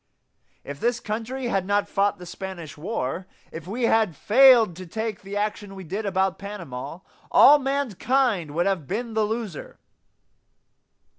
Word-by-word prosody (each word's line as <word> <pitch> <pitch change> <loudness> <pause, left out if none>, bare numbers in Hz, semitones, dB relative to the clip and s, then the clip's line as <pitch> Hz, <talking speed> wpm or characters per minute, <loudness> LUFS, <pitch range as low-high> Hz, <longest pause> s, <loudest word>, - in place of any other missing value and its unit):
If 140 0 -8
this 240 0 0
country 235 +5 -4
had 195 -5 -1
not 205 0 +1
fought 200 +1 +1
the 180 - -10
Spanish 175 -4 -8
War; 170 - -4 0.2
if 165 +1 -8
we 235 +6 -4
had 220 -7 +2
failed 235 - +6
to 185 -1 -9
take 220 +3 -4
the 200 +1 -6
action 205 -1 -3
we 190 - -8
did 200 +6 -4
about 190 -1 0
Panama; 175 -6 -7 0.3
all 295 +1 +7
mankind 260 - 0
would 175 - +1
have 190 -8 -1
been 225 +4 -3
the 220 -1 +1
loser. 215 -6 -5
205 Hz, 150 wpm, -24 LUFS, 185-230 Hz, 0.3 s, all